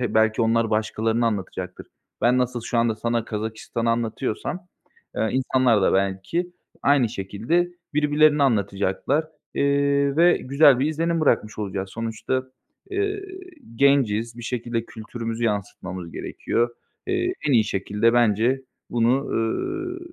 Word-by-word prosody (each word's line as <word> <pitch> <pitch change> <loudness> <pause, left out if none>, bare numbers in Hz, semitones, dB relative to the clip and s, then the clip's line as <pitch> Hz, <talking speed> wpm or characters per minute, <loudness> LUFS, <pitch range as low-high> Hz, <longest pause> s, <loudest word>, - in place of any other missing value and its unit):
belki 110 -1 +2
onlar 115 0 +2
başkalarına 110 +2 0
anlatacaktır. 95 -4 -4 0.4
Ben 125 +2 +4
nasıl 125 -1 0
şu 115 +1 -2
anda 115 -1 +2
sana 115 0 -1
Kazakistan’ı 110 +1 -3
anlatıyorsam, 115 - -2 0.5
eee, 110 - +1
insanlar 130 -4 +2
da - - +3
belki 100 - -1 0.3
aynı 140 -4 +4
şekilde 115 - -1 0.3
birbirlerine 150 0 +4
anlatacaklar, 105 +4 +1 0.3
eee, 140 0 +2
ve 175 +2 +5
güzel 140 0 +5
bir 135 - +1
izlenim 165 +2 0
bırakmış 115 -8 +1
olacağız. 95 -2 -4
Sonuçta, 115 +4 -3 0.5
eee, 400 0 -1 0.5
genciz, 120 -4 +2
bir - - -7
şekilde 115 -1 -3
kültürümüzü 115 +1 -5
yansıtmamız 95 -4 -3
gerekiyor. 120 +1 -1 0.4
Eee, 365 -1 0 0.2
en - - +3
iyi 115 -3 +5
şekilde 105 +3 +1
bence 120 +3 +2 0.3
bunu, 120 +4 +2
ııı, 360 - -2
120 Hz, 120 wpm, -24 LUFS, 110-140 Hz, 0.5 s, ve